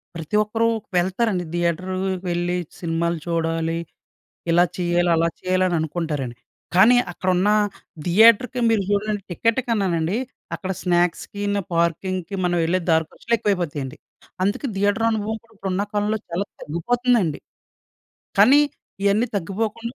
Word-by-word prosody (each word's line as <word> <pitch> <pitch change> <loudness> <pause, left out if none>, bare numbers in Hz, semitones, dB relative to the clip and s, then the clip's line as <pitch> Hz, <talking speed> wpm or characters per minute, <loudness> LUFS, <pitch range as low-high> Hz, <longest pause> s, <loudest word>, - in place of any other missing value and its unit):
ప్రతి 165 +4 -4
ఒక్కరు 225 +2 0 0.3
వెళ్తారండి. 185 +1 +1
థియేటర్ 175 +2 -1 0.4
వెళ్ళి 175 +1 0 0.2
సినిమాలు 170 0 -1
చూడాలి, 165 0 -1 0.7
ఇలా 175 +1 +5
చేయాలి, 175 -1 +1
అలా 165 +1 +2
చేయాలి 185 0 +1
అననుకుంటారండి. 155 -6 -2 0.4
కానీ 220 +7 +7 0.2
అక్కడున్న 185 +3 +1 0.6
థియేటర్‌కి 230 +7 +5
మీరు 215 -3 +2
చూడండి 205 0 0
టికెట్ 230 +7 +1
కన్నానండి 190 -5 0 0.4
అక్కడ 190 0 -4
స్నాక్స్‌కిను, 200 +3 0
పార్కింగ్‌కి 170 +2 -1
మనం 175 0 +1
వెళ్ళే 175 +3 +1
దారి 160 0 +4
ఖర్చులు 235 - -1
ఎక్కువైపోతాయండి. 165 -10 -2 0.5
అందుకే 205 +8 0
థియేటర్ 205 +3 +2
అనుభవం 220 0 -2
కూడా 230 -1 -24
ఇప్పుడు 195 -1 -3
ఉన్న 200 +2 0
కాలంలో 210 +1 +1
చాలా 180 +4 -2 0.2
తగ్గిపోతుందండి. 210 - +1 1.0
కానీ 285 +3 +7 0.4
ఇయన్నీ 205 +4 +3
తగ్గిపోకుండా 220 +6 -3
185 Hz, 115 wpm, -22 LUFS, 170-210 Hz, 1.0 s, కానీ